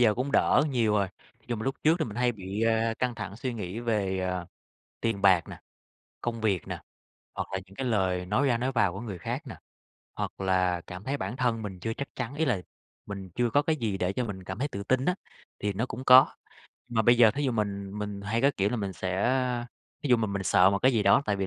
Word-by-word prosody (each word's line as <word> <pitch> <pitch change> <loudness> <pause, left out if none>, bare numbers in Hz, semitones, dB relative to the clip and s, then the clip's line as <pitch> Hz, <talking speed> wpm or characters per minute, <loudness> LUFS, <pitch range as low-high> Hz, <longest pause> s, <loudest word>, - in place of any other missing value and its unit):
giờ 110 -3 +5
cũng 130 +5 -2
đỡ - - +4
nhiều 115 -5 +2
rồi. 100 -2 +2 0.3
Ví 115 - -31
dụ 120 - -1
mà 110 - -5
lúc 135 - 0
trước 160 +3 +4
thì 160 - +1
mình 105 -5 -7
hay 125 0 +2
bị, 100 0 -5
a, 115 0 +2
căng 125 -1 0
thẳng 105 -2 -6
suy 125 -1 -3
nghĩ 105 0 -5
về, 100 -5 0
à, 90 -1 -2 0.5
tiền 115 -4 -1
bạc 95 -4 +5
nè, - - -8 0.6
công 115 -1 -3
việc 100 -6 0
nè, - - -4 0.5
hoặc - - -3
là 95 - 0
những 95 - -17
cái 135 - -2
lời 95 -6 +1
nói 105 +9 +2
ra 120 -2 +2
nói 130 +3 -1
vào 115 -8 +2
của 95 - -6
người 105 -6 -6
khác - - -4
nè, - - -7 0.6
hoặc - - -4
là 90 -2 +2
cảm 90 +2 -8
thấy 135 +4 -1
bản 115 -2 -4
thân 120 -3 0
mình 95 -4 -6
chưa 115 +4 -2
chắc 140 - -5
chắn, 125 +1 -4
ý 160 +2 +1
là 115 -10 +1 0.5
mình 100 -2 -7
chưa 120 -1 +2
có 145 +5 +3
cái 155 +1 +1
gì 110 -7 -2
để 90 0 0
cho 125 +4 -1
mình 95 -4 -6
cảm 95 +2 -6
thấy 145 - -1
tự 100 -7 -5
tin 130 +4 +1
á, 180 - +2 0.5
thì 105 0 0
nó 110 +6 -1
cũng 130 0 -7
có. 130 +1 +8 0.5
Mà 115 -2 +1
bây 120 +2 +5
giờ 115 -3 +8
thí 145 +6 -2
dụ 130 - +1
mình 100 -3 -2
mình 105 -1 -4
hay 110 +4 -1
có, 140 - +5
kiểu 100 +1 +1
là, 125 - -1
mình 100 -3 -3
sẽ, 120 +7 0 0.4
thí 145 - -2
dụ 125 - +6
mà 110 -2 0
mình 100 -1 -3
sợ 90 0 +5
một 100 - +1
cái 130 +4 +4
gì 110 -3 +2
đó 135 - +5
tại 105 - +1
vì 95 -1 -1
110 Hz, 260 wpm, -28 LUFS, 95-125 Hz, 0.6 s, có